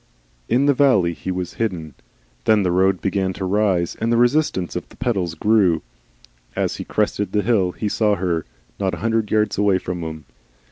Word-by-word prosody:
In 125 +5 +3
the 145 - +4
valley 115 -11 +3
he 80 +3 -7
was 90 -1 -3
hidden. 85 -9 -2 0.5
Then 110 -2 +4
the 90 - +1
road 95 +1 +2
began 95 -1 0
to 95 +1 -4
rise, 95 -3 +1
and 115 +1 -1
the 120 - +3
resistance 120 - +1
of 90 - -5
the - - -17
pedals 95 -10 -1
grew. 95 -3 +2 0.7
As - - -1
he - - -5
crested 105 -1 -1
the 105 -1 +1
hill 95 -5 +1
he 105 - -3
saw 105 0 +2
her, 85 -4 -1 0.4
not 95 -2 0
a - - -10
hundred 115 -2 +1
yards 110 -2 +1
away 100 -2 +3
from 90 -1 -5
him. 80 -2 -6
95 Hz, 190 wpm, -21 LUFS, 90-110 Hz, 0.7 s, the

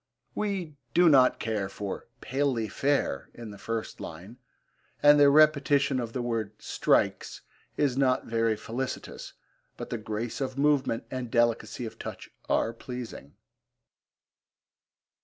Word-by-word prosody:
We 190 -8 -3 0.2
do 175 +1 +6
not 130 -4 +5
care 105 -4 -2
for 100 0 -6
'palely 130 -4 -1
fair' 140 +7 0
in 115 -3 -8
the 100 - -11
first 115 -1 -4
line, 95 +10 -9 0.6
and 145 0 +8
the 145 -1 +7
repetition 140 -2 +4
of 115 -2 -4
the 125 - -2
word 115 -3 -2
'strikes' - - 0 0.4
is 140 -3 +1
not 130 -2 +2
very 115 -1 +1
felicitous, 130 +5 -5 0.4
but - - -7
the 120 - -2
grace 110 +4 -4
of 130 0 -3
movement 140 -5 +2
and 130 -2 -4
delicacy 120 +1 +1
of 110 - -9
touch - - -8 0.2
are 115 - +1
pleasing. 115 - -8
125 Hz, 130 wpm, -28 LUFS, 115-140 Hz, 0.6 s, and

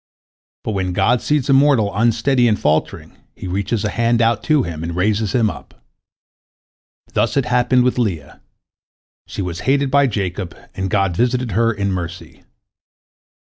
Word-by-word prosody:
But - - -3
when 95 -3 -2
God 115 +6 +2
sees 150 -3 0
a 135 - +3
mortal 135 -7 +3
unsteady 120 +3 +2
and 105 -2 +1
faltering, 75 +1 -1 0.2
He - - -9
reaches 100 +4 -2
a - - 0
hand 115 +1 +1
out 115 -2 +2
to 155 -4 +3
him, 80 -5 -6
and 85 +1 -4
raises 105 +2 0
him 115 -3 +3
up. - - -8 1.3
Thus - - 0
it 135 - +2
happened 125 0 +2
with 125 0 0
Leah. 90 - -3 0.9
She 100 - -5
was 85 -1 -5
hated 140 0 +2
by 140 0 +4
Jacob, 95 -5 -4 0.2
and 95 0 -3
God 95 -3 0
visited 125 +2 0
her 115 +4 +2
in 100 -3 -2
mercy. 85 -2 -6
110 Hz, 160 wpm, -19 LUFS, 95-125 Hz, 1.3 s, by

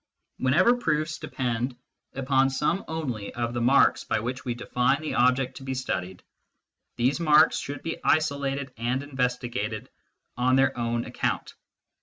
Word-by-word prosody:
Whenever 185 - +4
proofs 155 -5 -1
depend 125 0 -2 0.4
upon 135 0 +2
some 150 +7 0
only 130 -11 -4
of 120 0 -2
the 120 - -2
marks 130 +4 +4
by 110 - 0
which 125 +4 -4
we 120 -2 -2
define 125 +3 +1
the 155 -1 -4
object 125 +1 +2
to - - -10
be 130 0 -3
studied, 95 -8 -4 0.7
these 130 +6 +1
marks 155 -1 +5
should 140 -1 -6
be 165 - -3
isolated 140 -3 0
and 125 +4 -1
investigated 125 -5 -3 0.4
on 125 +1 +2
their 135 0 +3
own 120 0 -1
account. - - -2
130 Hz, 145 wpm, -26 LUFS, 120-145 Hz, 0.7 s, marks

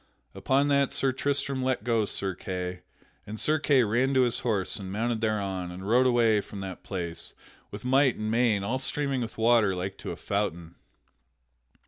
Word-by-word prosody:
Upon 135 +2 +1
that 140 -1 +3
Sir 135 - +1
Tristram 140 0 -1
let 130 0 0
go 115 -3 +1
Sir 95 -1 -2
Kay, 90 0 -5 0.5
and 110 +1 -6
Sir 155 +1 +2
Kay 140 -3 +4
ran 120 +5 +1
to 130 - +5
his 120 -2 +1
horse 105 -6 0
and 95 -1 -6
mounted 115 +2 -1
thereon 100 -5 -1
and 95 +2 -8
rode 125 +4 +4
away 115 -4 +3
from 100 - -9
that 95 -1 -7
place 85 -4 -4 0.4
with - - -9
might 130 0 +4
and 110 0 -3
main, 115 -4 +2
all 125 +6 -1
streaming 140 -1 -1
with 115 -1 -5
water 115 -4 +4
like 95 +2 -5
to - - -6
a - - -4
fountain. 85 -5 -3
115 Hz, 180 wpm, -27 LUFS, 95-130 Hz, 0.5 s, to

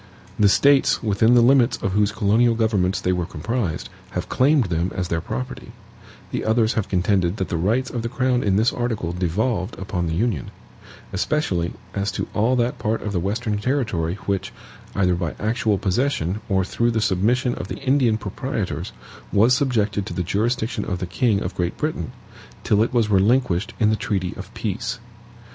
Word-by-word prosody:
The 105 -1 +6
States 140 +5 +4
within 110 +2 +3
the 120 - +6
limits 125 0 +4
of 95 - -2
whose 105 +1 +2
colonial 110 +3 +3
governments 100 -5 +1
they 90 - 0
were 90 -2 -2
comprised 95 0 -3 0.3
have - - -4
claimed 140 +1 +3
them 85 0 -1
as 90 -1 -2
their 85 -1 0
property, 65 -3 -6 0.6
the - - -2
others 110 0 +2
have 110 - -2
contended 90 0 +1
that 95 - -2
the - - -1
rights 110 +10 0
of 120 - -3
the 115 - -3
crown 125 0 +1
in 100 -4 +1
this 110 +4 +3
article 115 -8 -2
devolved 95 +4 -1
upon 95 -3 -3
the 80 - -2
Union; 100 - -1 0.6
especially 95 - 0 0.2
as 100 0 -1
to - - -3
all 115 +5 +2
that 120 0 0
part 110 0 -1
of 105 - -3
the 95 - 0
Western 105 +3 -1
territory 105 - -1
which, 95 -1 -1 0.4
either 90 -2 +2
by 85 -2 -2
actual 110 -1 +1
possession, 100 - 0
or 95 -2 +2
through 120 +4 0
the 115 -1 0
submission 110 +6 +1
of 90 - -6
the - - -5
Indian 130 -5 +2
proprietors, - - -4 0.4
was 115 +5 +5
subjected 110 -7 0
to - - -5
the 90 - -1
jurisdiction 110 +4 -1
of 90 - -3
the 90 - -3
king 100 +4 +1
of 90 - -4
Great 90 -1 -2
Britain, 150 - -2 0.5
till 105 0 +3
it 115 - +1
was 115 -4 +1
relinquished 100 -1 +2
in 110 -1 +4
the - - +3
treaty 100 -6 -2
of - - -9
peace. - - -3
105 Hz, 185 wpm, -22 LUFS, 95-120 Hz, 0.6 s, The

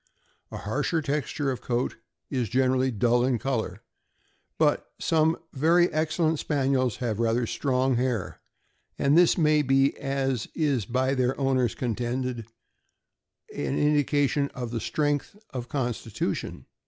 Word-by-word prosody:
A - - -7
harsher 145 +9 -1
texture 145 -1 -1
of 125 - -5
coat 120 0 -1 0.3
is 125 -6 -1
generally 130 +1 +2
dull 120 +1 +2
in 125 -1 +2
color, 110 -7 -3 0.7
but - - +2
some 160 0 +2 0.2
very 170 +5 +3
excellent 155 0 +1
Spaniels 135 -5 +1
have 115 -4 -3
rather 115 +1 +1
strong 130 +1 0
hair, 125 -6 -2 0.6
and 140 +1 +3
this 175 0 +5
may 155 -2 +4
be, 135 0 +3
as 135 -4 -1
is 140 - +1
by 130 +2 +1
their 130 0 0
owners 130 -3 +1
contended, 120 0 -3 1.1
an 70 -2 -2
indication 145 -1 +2
of 120 -3 -4
strength 145 +5 -1
of 125 -2 -6
constitution. 120 -5 -3
130 Hz, 125 wpm, -26 LUFS, 120-145 Hz, 1.1 s, this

